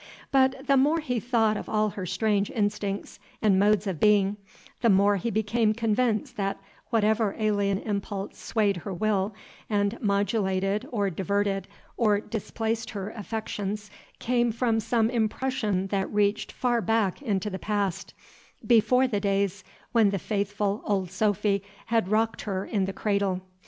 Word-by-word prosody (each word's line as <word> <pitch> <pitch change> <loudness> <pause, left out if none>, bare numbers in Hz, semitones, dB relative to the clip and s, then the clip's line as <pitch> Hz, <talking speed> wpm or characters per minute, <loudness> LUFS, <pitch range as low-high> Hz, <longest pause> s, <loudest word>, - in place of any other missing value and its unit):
But 265 0 +3
the 275 0 +4
more 295 +5 +3
he 250 -6 -2
thought 225 -2 +2
of - - -7
all 215 0 +2
her 190 -2 -6
strange 205 0 +1
instincts 205 -2 -2 0.2
and 200 -3 +3
modes 210 0 +3
of 185 -6 -3
being, 205 -1 +4 0.4
the 235 - +4
more 200 +1 +4
he 215 +5 -2
became 220 +1 +1
convinced 235 +3 0
that 195 -1 -1 0.3
whatever 220 -2 +2
alien 205 -2 +1
impulse 200 -1 -4
swayed 205 -4 0
her 195 +4 -6
will 205 +1 0 0.3
and 205 +1 0
modulated 200 +1 0
or 205 -5 0
diverted 195 +2 -1 0.3
or 210 -3 +3
displaced 225 +1 -3
her 200 0 -5
affections 210 -2 -4 0.3
came 240 -1 +1
from 230 0 +1
some 225 0 +1
impression 225 -3 0
that 195 -1 -1
reached 205 0 +1
far 240 -2 0
back 225 -1 +1
into 210 -5 -1
the 190 - -4
past, 200 -4 -2 0.5
before 250 +2 +4
the 210 -5 -1
days 200 -1 0 0.3
when 225 -4 +4
the 195 - -1
faithful 205 +1 -1
Old 190 -4 -1
Sophy 200 0 +1 0.2
had 225 -5 +1
rocked 225 +1 +1
her 195 -2 -3
in 200 -4 0
the 195 - -3
cradle. 200 -2 0
210 Hz, 150 wpm, -27 LUFS, 200-225 Hz, 0.5 s, the